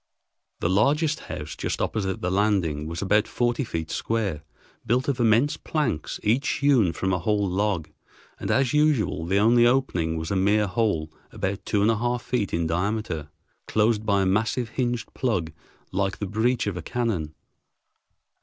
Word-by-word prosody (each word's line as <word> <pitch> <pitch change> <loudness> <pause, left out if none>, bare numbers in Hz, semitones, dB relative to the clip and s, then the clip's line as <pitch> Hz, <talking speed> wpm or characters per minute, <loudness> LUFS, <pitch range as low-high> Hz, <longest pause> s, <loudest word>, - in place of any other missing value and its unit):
The - - +1
largest 150 - +2
house, 75 +1 -5
just - - -3
opposite 95 -3 -2
the 90 - -1
landing, 95 -7 +1
was 85 +4 -4
about 105 +2 +3
forty 120 +2 0
feet 80 -8 -4
square, 105 -9 -1 0.4
built 125 +4 +1
of 140 -3 0
immense 120 +5 +3
planks, 120 - -2
each 120 +7 +2
hewn 135 -11 +3
from 95 +3 -1
a 90 - 0
whole 105 +3 +1
log, 95 -3 0 0.5
and, - - -4
as 135 -1 +2
usual, 145 - +2
the 95 +3 +2
only 120 +3 +5
opening 90 -11 +1
was 80 +2 -4
a - - +1
mere 105 +3 +3
hole 90 -6 0 0.2
about 95 +1 -3
two 100 -2 +2
and 110 - +4
a 110 - 0
half 120 +1 -1
feet 120 -6 -1
in 85 0 0
diameter, 85 -2 -2 0.4
closed 110 0 +2
by 100 -2 +2
a - - +1
massive 110 +5 0
hinged 120 -1 -2
plug 95 -11 -1 0.4
like 95 0 -1
the 105 - -3
breach 115 +5 0
of 100 -3 -2
a 90 - -4
cannon. 90 -8 -2
105 Hz, 170 wpm, -25 LUFS, 90-120 Hz, 0.5 s, only